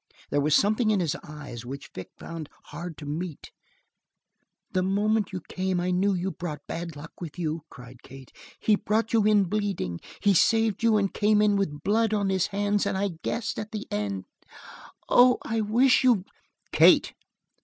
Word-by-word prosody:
There 145 - +2
was 150 +1 +3
something 215 +4 +2
in 210 -2 +2
his 170 -2 0
eyes 145 -6 -9
which 135 +3 -8
Vic 95 - -8
found 165 -3 -7 0.2
hard 170 +2 -7
to 150 - -9
meet. 155 +2 -5 1.2
"The 185 - +1
moment 205 +2 +1
you 185 -1 -5
came 185 -1 -1
I 180 +1 -1
knew 190 +2 +2
you 185 +2 -2
brought 155 -5 -6
bad 170 -2 -5
luck 150 +3 -10
with 165 -2 -7
you!" 160 -2 -2
cried 125 0 -13
Kate. 135 -1 -13 0.3
"He 215 - +3
brought 220 +2 -1
you 220 -2 +4
in 210 -1 +5
bleeding. 195 - -2 0.2
He 200 - +3
saved 225 +3 +3
you 225 -2 +4
and 200 -2 0
came 210 0 +3
in 210 -1 +3
with 150 -8 -2
blood 220 +1 +2
on 200 -2 0
his 190 -2 +1
hands 205 0 0
and 195 -1 -1
I 200 +1 0
guessed 230 -1 -3
at 215 0 -6
the 215 - -4
end. 100 -2 -3 0.8
Oh, 250 0 +6
I 225 -1 -1
wish 245 +5 +3
you 235 -7 +3 0.2
" - - -45
"Kate!" - - +5
190 Hz, 185 wpm, -26 LUFS, 155-210 Hz, 1.2 s, Oh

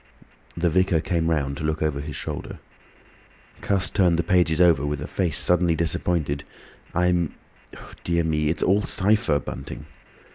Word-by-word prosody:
The 85 0 +1
vicar 90 -1 +2
came 85 -1 -1
round 70 -4 -1
to - - -6
look 80 0 -1
over 75 -2 -1
his 75 -1 -7
shoulder. - - -6 1.0
Cuss 95 -1 +1
turned 90 -5 +3
the 85 - +1
pages 85 -2 +2
over 85 -6 +5
with 75 0 -2
a 75 - -5
face 85 -6 -1
suddenly 90 -1 +3
disappointed. 80 -3 -1 0.5
"I'm—dear 85 0 -2
me! 75 -1 0
It's 80 - -1
all 100 +3 +3
cypher, 100 -7 +2
Bunting." 70 - -7
85 Hz, 145 wpm, -24 LUFS, 75-90 Hz, 1.0 s, over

